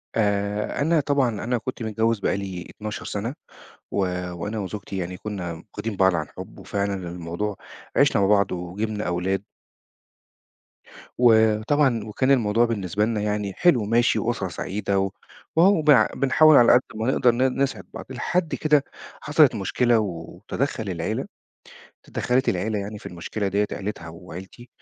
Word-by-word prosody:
آآ، 105 +2 0
أنا 160 +2 +3
طبعًا 140 -3 +2
أنا 125 +2 0
كنت 120 +1 -5
متجوّز 110 +1 0
بقالي 95 -3 -2
12 105 -1 -7
سنة، 115 +7 -3 0.6
و - - -3 0.4
وأنا 105 +5 -4
وزوجتي 100 0 -5
يعني 90 0 -4
كنّا 95 -5 -5 0.2
واخدين 110 -3 -4
بعض 95 -2 +4
عن 75 -3 -2
حُب، - - -10
وفعلًا 100 0 -2 0.2
الموضوع 90 +4 -4 0.4
عشنا - - +4
مع 95 - +3
بعض 100 -2 +3
وجِبنا 105 +5 -3
أولاد. 95 +3 -1 1.7
وطبعًا 115 +2 +3
وكان 120 +5 0
الموضوع 115 -3 +3
بالنسبة 105 -3 -1
لنا 110 -2 -1
يعني 105 -1 -2
حلو 160 - +3
وماشي 115 +3 +2
وأسرة 115 -4 -1
سعيدة 100 +2 -2
و 95 0 0 0.4
وأهو 175 +1 +5
بنع 150 -4 +6
بنحاول 145 +3 +5
على 120 - +7
قد 125 - +6
ما 110 +4 0
نقدر 125 -2 +4
ن 130 +2 0
نسعد 135 -1 -1
بعض، - - -7
لحد 160 +6 -1
كده 150 -2 +3 0.4
حصلت 150 -4 +4
مشكلة 115 +4 +2
وتدخل 105 +5 -4
العيلة 85 -3 -2 0.8
اتدخلت 130 +2 0
العيلة 105 +4 0
يعني 105 +1 -5
في - - -12
المشكلة 95 +4 -4
ديّة، 100 +2 +1
عليتها 95 -4 -5
وعيلتي 90 +8 -11
105 Hz, 145 wpm, -24 LUFS, 95-125 Hz, 1.7 s, على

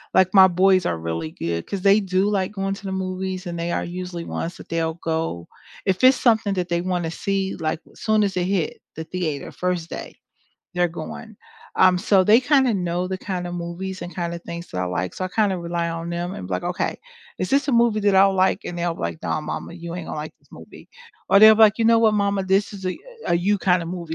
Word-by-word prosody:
Like, 190 +1 +4
my 190 -1 +9
boys 185 0 +3
are 85 - -1
really 80 -1 -4
good 85 0 -4
'cause 195 -2 -4
they 200 +1 +6
do 190 0 0
like 190 -2 0
going 195 -1 -2
to 195 - -9
the 190 - -3
movies 185 0 -3
and 170 -1 -5
they 170 +1 -2
are - - -1
usually 175 -1 -6
ones 170 +2 -4
that - - -13
they'll 165 -1 -1
go. 160 - -3 0.4
If 190 +6 0
it's 260 0 +7
something 220 -4 +2
that 180 -1 -2
they 170 0 0
want 180 -1 -1
to 160 - -3
see 195 +2 -2
like 155 -1 -2
soon 215 -1 +1
as 195 -2 -1
it 180 - 0
hit 185 -4 -1
the 160 - -5
theater, 160 -5 -4
first 180 -2 -2
day, - - -7 0.6
they're 180 0 +3
going. 175 +7 -8 0.4
Um, 185 -1 +5
so 195 0 +3
they 215 +5 +6
kinda 265 -2 +3
know 180 -2 -1
the 190 0 -3
kinda 180 -2 -4
movies 175 +2 -5
and 175 +1 -7
kinda 170 -1 -3
things 170 +1 -8
that - - -5
I - - 0
like, 90 0 -2
so, 185 - -4
I - - -2
kind 205 +1 +1
of 180 - -3
rely 170 0 -2
on 165 0 -5
them 175 +1 -3
and 90 - -7
be 95 - -7
like, 90 - -3
"Okay - - -2 0.4
is 185 - -2
this 275 +1 +2
a 280 - 0
movie 235 -2 +3
that 205 -1 +2
I 190 0 +7
like?" 190 -1 +2
and 175 - -5
they'll 170 -1 -1
be - - -11
like, 160 - -4
"Nah 155 - -1
mama, 150 - -5
you 170 -1 -7
ain't 180 - -6
gonna - - -5
like 150 +1 -5
this - - -31
movie." - - -13 0.4
or 200 - +6
they'll 220 0 +9
be - - 0
like, 215 0 +6
"You 230 - +1
know 230 0 +5
what 220 -2 +4
mama, 200 -1 0
this 195 +3 +1
is 195 -2 -7 0.4
a - - +2
you 200 +4 +1
kind 180 -2 +2
of 165 - -6
movie", 170 -3 -5
185 Hz, 250 wpm, -22 LUFS, 170-195 Hz, 0.6 s, my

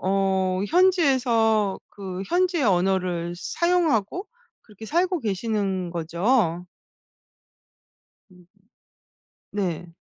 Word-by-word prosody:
어 190 -1 +1
현지에서 250 - +2
그 190 -2 -6
현지의 355 -3 +1
언어를 180 -3 0
사용하고 340 - 0 0.3
그렇게 220 0 -12
살고 355 - +1
계시는 195 -4 -2
거죠? 175 +2 0 1.7
으음. 180 -1 -20 1.1
네. 180 -4 -3
200 Hz, 175 characters per minute, -24 LUFS, 185-265 Hz, 1.7 s, 현지에서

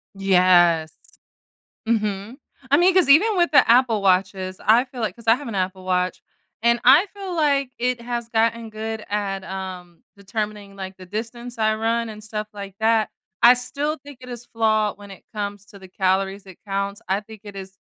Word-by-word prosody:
Yes. 180 -4 +4 1.0
Mhm. 210 +1 -1 0.3
I 285 - +6
mean, 360 +1 +4
'cause 365 -6 +4
even 390 +9 +5
with 345 -1 +3
the 285 - +6
Apple 235 -3 +4
watches, 185 0 +1
I 230 +4 +5
feel 255 -2 -10
like 220 - -2
'cause 230 -1 -15
I 225 - +6
have 265 -1 -7
an 215 - -5
Apple 185 0 -2
watch, 180 0 -1 0.4
and 235 0 +3
I 290 +10 +7
feel 385 -3 -6
like 280 -4 +1
it 250 0 -1
has 240 -1 -4
gotten 230 0 0
good 220 0 -5
at, 195 -2 -2
um, 185 -3 -8
determining, 205 0 -5
like, 190 -1 -7
the 185 - -11
distance 235 +4 -6
I 215 0 +2
run 230 +1 -1
and 215 0 -10
stuff 215 0 -5
like 200 -2 -9
that. 220 -1 +2 0.3
I 240 +1 +9
still 285 +5 -2
think 285 -2 -14
it 250 - -11
is 240 -1 -8
flawed 215 -3 0
when 205 -1 -12
it 195 - -13
comes 205 -1 -5
to 200 - -14
the 190 -1 -13
calories 190 +1 0
it 190 -2 -14
counts. 200 +2 -3
I 195 +2 +1
think 215 -1 -13
it 200 -1 -10
is 190 0 -9
215 Hz, 190 wpm, -22 LUFS, 195-240 Hz, 1.0 s, I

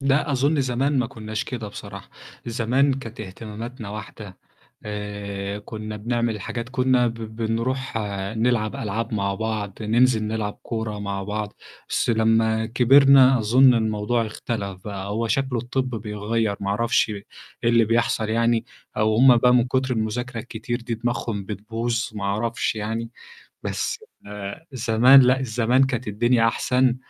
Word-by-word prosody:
لأ، 140 +1 +1
أظُن 140 +3 +2
زمان 130 +2 0
ما 125 - +1
كنّاش 110 -1 -5
كده 115 -5 -5
بصراحة، 100 -1 -10 0.4
زمان 125 +4 +2
كانت 120 -4 -8
اهتماماتنا 110 +3 -7
واحدة، 105 -2 -9 0.5
آآ، 100 -1 -5
كنّا 110 0 -7
بنعمل 120 +1 -1
الحاجات 115 +4 -5
كنّا 130 -1 +2
ب 115 - -2 0.2
بنروح 115 +3 -2 0.4
نلعب 110 -2 +1
ألعاب 115 +2 -3
مع 100 -1 0
بعض، 110 -2 -3
ننزِل 115 +1 +3
نلعب 105 -1 -3
كورة 110 -3 -4
مع 100 -1 -3
بعض، 105 +1 -4 0.3
بس - - 0
لمّا 110 0 +2
كبرنا 130 +2 +6
أظُن 125 +4 +5
الموضوع 110 +1 0
اختلَف 100 -4 -5
بقى، 100 -1 -5
هو 115 +2 -1
شكله 130 -1 0
الطِب 125 +2 -2
بيغيّر 105 0 -2
ما 100 - -3
أعرفش 115 +2 +2
إيه 100 -1 -6 0.4
اللي 115 -1 +4
بيحصل 115 -1 +1
يعني، 115 0 +2 0.3
أو 110 0 +2
هُم 125 0 +7
بقى 125 +1 +4
من 120 -1 +4
كُتر 130 0 0
المذاكرة 115 +2 -2
الكتير 120 +1 -5
دي 115 0 -3
دماغهم 115 -3 -2
بتبوظ 115 +3 -3
ما 105 -2 -5
أعرفش 110 +5 -1
يعني، 115 +2 -3 0.5
بس 470 - -2 0.3
آآ، 105 +9 -7
زمان 125 +2 +6
لأ، 130 +1 +4
الزمان 125 +1 +2
كانت 125 -3 -3
الدنيا 115 +3 +2
أحسن، 125 +1 +1
115 Hz, 145 wpm, -23 LUFS, 105-125 Hz, 0.5 s, هُم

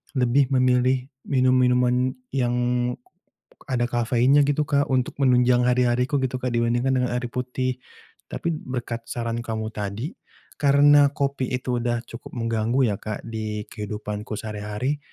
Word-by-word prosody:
lebih 130 +2 +3
memilih 130 +1 +2 0.2
minum-minuman 125 -1 +3 0.2
yang 125 -3 0 1.2
ada 120 -1 +1
kafeinnya 120 +4 +3
gitu, 145 +1 +1
Kak, 140 0 +1
untuk 130 -1 0
menunjang 125 -1 +4
hari-hariku 125 +2 +2
gitu, 130 -1 -2
Kak, 125 - -1
dibandingkan 120 +3 +1
dengan 125 -1 0
air 125 0 -1
putih. 125 0 -2 0.5
Tapi 170 - -3
berkat 120 -2 -5
saran 115 -1 -3
kamu 110 -1 -4
tadi 105 - -4 0.5
karena 145 0 +5
kopi 140 -3 -1
itu 125 -1 -1
udah 120 -1 -1
cukup 115 - -10
mengganggu 115 +1 0
ya, 100 - -1
Kak, 110 -1 -5
di 110 -2 -4
kehidupanku 105 0 -5
sehari-hari. 105 +6 -3
125 Hz, 130 wpm, -24 LUFS, 115-130 Hz, 1.2 s, karena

